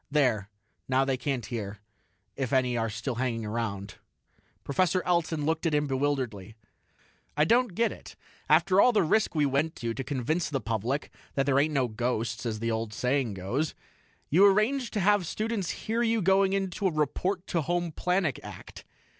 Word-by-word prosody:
"There; 125 -9 +1 0.4
now 130 +1 +2
they 135 -1 +1
can't 130 -2 -2
hear 105 -4 -5 0.6
if 135 -4 -3
any 130 -2 +2
are 115 -1 0
still 110 +5 -3
hanging 115 -3 -1
around." 105 -3 -4 0.7
Professor 180 +4 +1
Elton 165 -4 0
looked 160 +2 0
at 155 - +1
him 150 0 +2
bewilderedly. 130 -7 -2 0.8
"I 150 - +4
don't 235 0 +2
get 230 +1 +2
it. - - -11 0.3
After 190 +1 +5
all 250 - +5
the 205 -3 +4
risk 215 +3 +1
we 150 -2 +3
went 140 +4 0
to, 115 -1 -3
to 135 - -4
convince 145 +5 -1
the 140 -3 -1
public 115 +6 -2 0.2
that 135 - +1
there 140 -1 +3
ain't 150 +1 +1
no 130 -2 +2
ghosts 115 0 -2
as 110 -2 -2
the 115 +1 -2
old 110 -1 -3
saying 125 -4 0
goes 120 +12 -2 0.6
you 175 +7 +6
arrange 215 +6 +3
to 215 - -2
have 200 -2 +3
students 215 -3 -2 0.2
hear 225 +2 0
you 230 -1 +2
going 195 +1 +4
into 195 0 0
a - - +1
'report 175 +5 -1
to 180 - -2
the 155 - -4
home 175 -1 0
planet' 180 -4 0
act. - - -10
145 Hz, 180 wpm, -28 LUFS, 120-180 Hz, 0.8 s, you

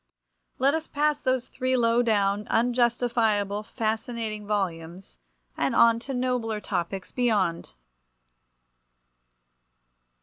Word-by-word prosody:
Let 275 +2 +3
us 320 0 -2
pass 295 0 0
those 255 -1 0
three 255 0 -1
low 235 0 +3
down, 205 -3 +1
unjustifiable, 230 -4 +1
fascinating 220 -1 -3
volumes, 180 - -4 0.4
and - - 0
on 230 0 +5
to 270 +3 -6
nobler 245 -4 -1
topics 185 -1 -4
beyond! 200 - 0
225 Hz, 95 wpm, -26 LUFS, 205-245 Hz, 0.4 s, on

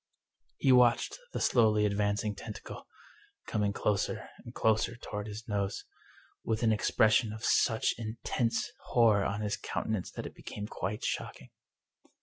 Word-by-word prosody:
He 135 - +3
watched 125 - +4
the - - -3
slowly 110 -3 +4
advancing 105 +1 0
tentacle, - - -9 0.6
coming 105 -2 0
closer 100 -1 -1
and - - -9
closer 110 -1 +1
toward 105 -3 -6
his 105 +1 -8
nose, 100 -2 -2 0.6
with 110 +1 -1
an 110 - +4
expression 110 +1 +3
of 110 +1 -6
such 110 -1 +3
in 110 0 -5
tense 115 -2 0
horror 110 -4 +4
on 100 +2 -2
his 105 -1 -1
countenance 110 -5 -3
that - - -6
it - - -7
became 105 - -7
quite 105 0 -4
shock - - -3
ing. 60 - -16
110 Hz, 145 wpm, -31 LUFS, 105-115 Hz, 0.6 s, watched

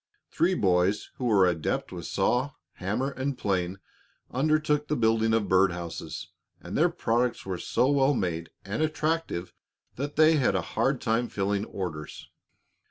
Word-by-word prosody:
Three 180 +3 +2
boys 95 - +1
who 125 - -3
were 100 -5 +5
adept 85 -3 -1
with - - -6
saw, 130 +3 +1 0.2
hammer, 110 +9 -1
and 135 0 -3
plane 95 -4 -1 0.5
undertook 150 +2 +1
the 150 - 0
building 110 -2 +2
of 110 -2 +1
bird 95 0 +4
houses, 85 -1 -6 0.3
and - - -7
their 170 +4 +4
products 125 -7 0
were 95 -2 -3
so 125 - +1
well 140 0 +3
made 85 -5 -2 0.2
and 100 +9 -3
attractive 155 - -1 0.4
that 140 +3 -4
they 155 +1 +6
had 135 - +2
a - - +2
hard 135 -1 +1
time 115 +2 0
filling 100 +1 -1
orders. 85 -8 -6
115 Hz, 155 wpm, -27 LUFS, 95-140 Hz, 0.5 s, they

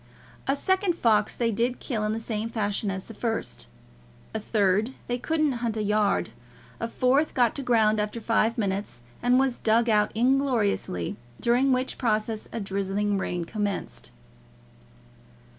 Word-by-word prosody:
A 275 - +3
second 375 +4 +1
fox 215 -8 +2
they 230 -1 +1
did 235 +4 0
kill 225 -6 -2
in 210 - 0
the 220 - -2
same 225 -1 -3
fashion 205 -2 -1
as 190 -1 -4
the 225 - -10
first; 225 - -3 0.7
a 220 - -1
third 210 +3 +1
they 245 0 -2
couldn't 310 +1 +1
hunt 230 -2 -1
a 215 - 0
yard; 210 -1 +1 0.5
a 230 - -2
fourth 255 +6 +1
got 240 -3 +3
to - - -2
ground 220 -4 +3
after 210 +2 -2
five 225 0 +1
minutes, 195 - -2 0.2
and 245 +1 +4
was 265 -2 +1
dug 230 +2 +3
out 210 -1 +3
ingloriously; 230 - +1 0.2
during 250 +3 +3
which 255 0 -1
process 215 -2 -1
a - - -3
drizzling 200 0 -1
rain 175 -2 -2
commenced. 200 - -4
225 Hz, 155 wpm, -26 LUFS, 210-245 Hz, 0.7 s, and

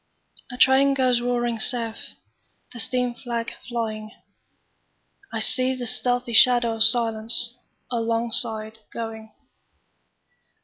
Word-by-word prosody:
A 245 - -9
train 270 +2 +4
goes 255 -3 +1
roaring 240 -1 -3
south, 230 -1 -1 0.6
The 235 - -9
steam 250 +1 -2
flag 235 -2 -6 0.2
flying;I 225 - -11
see 255 +4 +4
the 250 -1 -7
stealthy 245 +1 -1
shadow 240 -1 +4
of - - -5
silenceAlongside 230 -1 0
going. 220 -1 -8
235 Hz, 90 wpm, -22 LUFS, 225-245 Hz, 0.6 s, train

